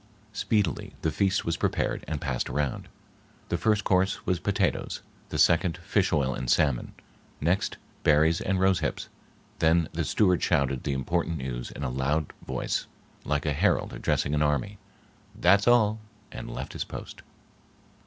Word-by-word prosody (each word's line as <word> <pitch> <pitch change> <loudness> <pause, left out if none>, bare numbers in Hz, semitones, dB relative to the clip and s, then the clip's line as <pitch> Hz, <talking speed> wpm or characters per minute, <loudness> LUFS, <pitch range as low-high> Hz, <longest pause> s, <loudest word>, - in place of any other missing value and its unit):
Speedily 100 -4 0
the 80 - +1
feast 100 +4 +1
was 85 0 0
prepared - - -1
and 75 0 -2
passed 65 -5 -2
around. 70 -1 -2 0.6
The - - 0
first 105 -1 +2
course 95 0 +1
was 90 -2 +1
potatoes, - - -1 0.3
the - - -3
second 85 -1 +3
fish - - 0
oil 65 -3 +1
and 65 -1 -4
salmon, 70 -3 +2 0.5
next 90 +6 0 0.2
berries 80 +3 +4
and 95 0 0
rose 95 -2 +3
hips; 75 - -3 0.5
then 80 0 +3
the - - -1
steward 90 -4 +2
shouted 70 -6 +1
the 70 - 0
important 85 +5 -1
news, 65 -3 -4
in 70 - -7
a 65 - -1
loud 70 +4 -1
voice 65 -1 -2 0.4
like 75 +1 0
a 75 - +1
herald - - +1
addressing 70 - 0
an 75 - +1
army, 75 +8 0 0.6
"That's 100 +4 +4
all!" 110 -3 +4 0.3
and - - -7
left - - -6
his - - -2
post. - - -9
80 Hz, 155 wpm, -27 LUFS, 70-95 Hz, 0.6 s, berries